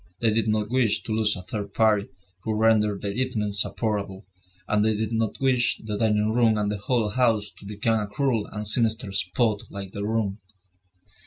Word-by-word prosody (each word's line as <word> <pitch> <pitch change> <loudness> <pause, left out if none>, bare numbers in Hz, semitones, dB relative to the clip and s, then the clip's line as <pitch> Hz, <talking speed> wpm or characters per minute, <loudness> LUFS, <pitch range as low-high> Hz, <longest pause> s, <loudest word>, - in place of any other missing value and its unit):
They 115 -2 +2
did 110 -1 +1
not 105 0 0
wish 125 -5 +2
to - - -6
lose 110 -1 +2
a 90 - -7
third 100 +1 -6
party 110 -2 +3 0.3
who 110 +1 -2
rendered 105 -2 +2
their 100 - -1
evenings 105 -4 0
supportable; 100 -3 -2 0.4
and 105 -1 +2
they 110 -1 +2
did 110 +1 -2
not 110 -1 -1
wish 130 -3 +2
the 105 -1 -3
dining 105 0 +2
room 115 -2 +3
and 105 -1 0
the 105 - -3
whole 115 +1 0
house 110 -3 +1
to - - -13
become 110 +2 0
a 105 - -3
cruel 115 -1 0
and 105 0 -6
sinister 110 -1 0
spot 105 +3 +1
like 100 -1 -7
their 100 0 -4
room. 110 -2 -1
110 Hz, 190 wpm, -25 LUFS, 105-115 Hz, 0.4 s, party